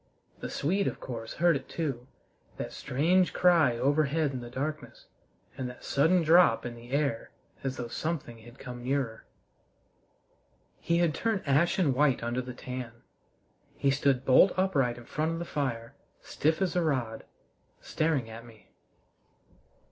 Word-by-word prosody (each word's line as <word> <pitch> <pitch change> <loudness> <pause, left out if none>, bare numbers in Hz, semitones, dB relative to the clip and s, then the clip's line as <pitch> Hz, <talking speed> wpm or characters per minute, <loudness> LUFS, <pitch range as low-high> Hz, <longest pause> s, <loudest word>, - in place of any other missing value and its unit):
The - - -5
Swede, 195 +7 0
of - - -3
course, 115 -3 -6
heard 170 0 +3
it 135 -1 -5
too 135 -7 -3 0.5
that - - -5
strange 175 +8 +1
cry 165 -9 +4
overhead 145 +3 +1
in 130 -2 -5
the 120 - -8
darkness 150 +5 -5 0.5
and 130 -1 -4
that 125 - -12
sudden 165 +5 +3
drop 160 -8 +5
in 120 - -4
the 120 +1 -13
air 140 +1 -1 0.3
as 130 -1 -3
though 120 - -4
something 135 -3 -4
had 120 +3 -15
come 125 -2 -8
nearer. 130 -3 -2 1.5
He 170 - 0
had 170 -3 +2
turned 215 +4 -1
ashen 155 +2 +3
white 135 -2 +2
under 120 +2 -1
the 125 -1 -8
tan. 125 -2 -6 0.8
He 140 - +2
stood 135 -1 +1
bolt 135 +8 +6
upright 140 -11 +1
in 120 - -11
front 155 +2 -1
of - - -3
the 170 - -4
fire, 120 -7 -3 0.3
stiff 160 +5 0
as 180 -2 -1
a 180 - +3
rod, 130 -8 -1 0.6
staring 155 -7 -1
at 115 +1 -9
me. 115 -2 -17
140 Hz, 155 wpm, -29 LUFS, 125-160 Hz, 1.5 s, bolt